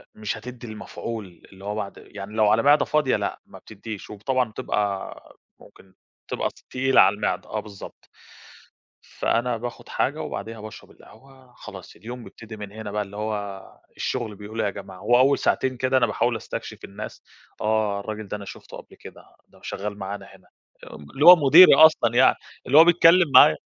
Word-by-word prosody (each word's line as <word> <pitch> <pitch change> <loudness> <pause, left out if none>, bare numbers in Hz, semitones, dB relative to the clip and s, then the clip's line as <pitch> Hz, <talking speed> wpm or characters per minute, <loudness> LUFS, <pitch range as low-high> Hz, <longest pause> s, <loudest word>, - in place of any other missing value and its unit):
مش 110 0 -4
هتدي 120 +1 -10
المفعول 110 -3 -8
اللي 95 +1 -14
هو 105 +1 -3
بَعد 100 -2 -5
يعني 100 +1 -10
لو 110 -1 +2
على 115 +3 +2
معدة 145 +1 +4
فاضية 150 -4 +1
لأ - - -3
ما - - -14
بتديش، 110 0 -10
وب 105 -1 -11
طبعًا 130 -3 0
بتبقى 100 -2 -4 0.2
ممكن 95 -1 -19 0.3
تبقى - - -2 0.2
تقيلة 135 +1 +3
على 100 +2 +4
المعدة، 100 -3 -3
آه 110 - -3
بالضبط. 100 -2 -12 0.9
فأنا 120 0 -2
باخد 120 +1 -8
حاجة - - -1
وبعديها 110 +2 -7
باشرب 110 0 -11
القهوة، 130 -2 -19
خلاص 95 -2 -12
اليوم 120 +2 -9
بيبتدي 110 -1 -12
من 105 -1 -8
هنا 110 -1 -8
بَقى، 105 0 -2
اللي 100 +1 -12
هو 105 -3 -4 0.3
الشغل 115 -5 -3
بيقول 105 +2 -9
إيه - - 0
يا - - -2
جماعة، 95 -2 -11
وأول 130 +3 +3
ساعتين 130 -1 0
كده 130 +1 +1
أنا 120 - +3
باحاول 120 0 -1
أستكشف - - -8
الناس، 100 +2 -9 0.4
آه 105 -2 0
الراجل 110 0 -7
ده 105 - -5
أنا 100 - -10
شُفته - - -11
قبل - - -15
كده، - - -14 0.2
ده - - -23
شغال 105 +1 -5
معانا 100 +1 -6
هنا، - - -19 0.5
ام 70 -1 -13
اللي 145 +4 0
هو 180 +1 +12
مديري 160 +4 +8
أصلًا 135 -7 +5
يعني 130 - +5 0.3
اللي 140 +4 +4
هو 160 - +10
بيتكلم 170 -2 +5
معايا. 75 - +8
110 Hz, 180 wpm, -23 LUFS, 100-125 Hz, 0.9 s, هو